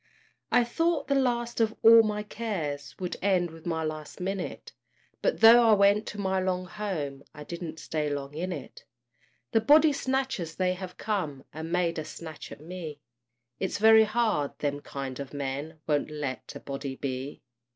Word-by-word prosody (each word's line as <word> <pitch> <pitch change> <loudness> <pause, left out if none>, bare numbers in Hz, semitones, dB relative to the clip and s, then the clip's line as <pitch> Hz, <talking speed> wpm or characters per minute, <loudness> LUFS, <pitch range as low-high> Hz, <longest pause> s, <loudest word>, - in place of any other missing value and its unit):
I 245 - +5
thought 315 +5 0
the - - +3
last 240 -3 0
of 220 0 +1
all 230 0 +10
my 210 -1 -1
cares 175 -11 -4
Would 180 -2 -4
end 185 -3 +2
with 165 +1 -11
my 160 -1 -1
last 155 -1 -5
minute; 190 0 -4 0.5
But - - 0
though 230 +2 +9
I - - +7
went 200 +1 +4
to 210 - -6
my 190 -1 0
long 185 -1 -1
home, 175 -9 -4
I 150 - -8
didn't 170 0 -6
stay 155 -2 -2
long 140 0 -4
in 180 +5 -3
it. 150 -6 -8 0.7
The 225 - +3
body 295 +5 +6
snatchers 265 - -2
they 185 -1 +1
have 185 0 -8
come, 170 -11 -3
And 160 +1 -6
made 170 -2 +1
a - - -3
snatch 160 0 -9
at - - -10
me; 160 -3 -7 0.6
It's 190 - -1
very 220 +1 +7
hard 215 -10 0
them 145 -1 -2
kind 135 -2 -6
of 140 0 -7
men 140 +3 -4
Won't 150 -1 0
let 140 -6 -5
a - - -6
body 135 -1 -5
be! 135 +1 -5
180 Hz, 175 wpm, -28 LUFS, 150-215 Hz, 0.7 s, all